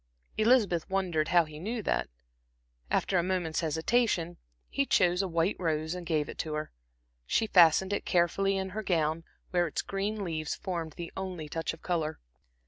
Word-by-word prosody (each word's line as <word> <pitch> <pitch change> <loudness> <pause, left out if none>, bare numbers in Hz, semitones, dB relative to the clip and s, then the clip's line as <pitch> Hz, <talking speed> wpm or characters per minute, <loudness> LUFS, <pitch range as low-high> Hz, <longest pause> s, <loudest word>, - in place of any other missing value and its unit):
Elizabeth 215 -7 +3
wondered 180 -5 0
how 175 -2 +4
he 155 -1 -10
knew 220 +5 -3
that. - - 0 0.8
After 185 - +2
a - - +1
moment's 180 -3 -1
hesitation, 170 +2 +1 0.3
he 280 - 0
chose 180 -8 +3
a 195 - -1
white 170 +2 +1
rose 160 -2 -1
and 180 -2 -6
gave 155 -3 +1
it - - -9
to 155 -1 -2
her. 155 0 -4 0.6
She 225 - +2
fastened 185 0 +5
it 205 - -1
carefully 195 +2 +2
in 190 0 -2
her 210 +3 -4
gown, 165 -4 0 0.3
where 175 -1 +2
its 155 - -3
green 200 +2 -2
leaves 155 -4 -3
formed 170 -5 -4
the 170 -1 -7
only 185 -5 -5
touch 165 +2 -2
of 165 - -12
color. 160 -3 -1
175 Hz, 175 wpm, -30 LUFS, 160-195 Hz, 0.8 s, fastened